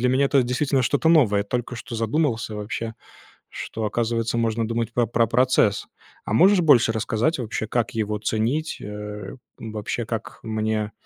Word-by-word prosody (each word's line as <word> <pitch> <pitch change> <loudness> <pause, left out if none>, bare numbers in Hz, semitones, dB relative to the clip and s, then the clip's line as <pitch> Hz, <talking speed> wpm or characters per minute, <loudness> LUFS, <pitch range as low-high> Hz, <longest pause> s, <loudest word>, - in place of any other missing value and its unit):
для 125 - +2
меня 135 +2 +3
это 135 -2 +3
действительно 130 +2 +1
что-то 145 +5 +1
новое. 105 -11 +4
Только 120 +2 -3
что 115 - -8
задумался 115 -2 0
вообще, 110 +2 -4 0.6
что, 110 -1 -5
оказывается, 115 +1 -1
можно 115 -1 0
думать 115 0 -2
про 120 -1 +2
про 115 0 +2
процесс. 115 -4 +2 0.4
А - - -3
можешь 190 - +6
больше 130 -8 +5
рассказать 115 +7 0
вообще, 110 -2 -3
как 120 0 -1
его 105 -1 -2
ценить, 115 +9 -1
э, 105 -1 -7 0.2
вообще, 110 +1 -4
как 115 -2 -5
мне, 110 -1 -1
115 Hz, 155 wpm, -23 LUFS, 110-125 Hz, 0.6 s, можешь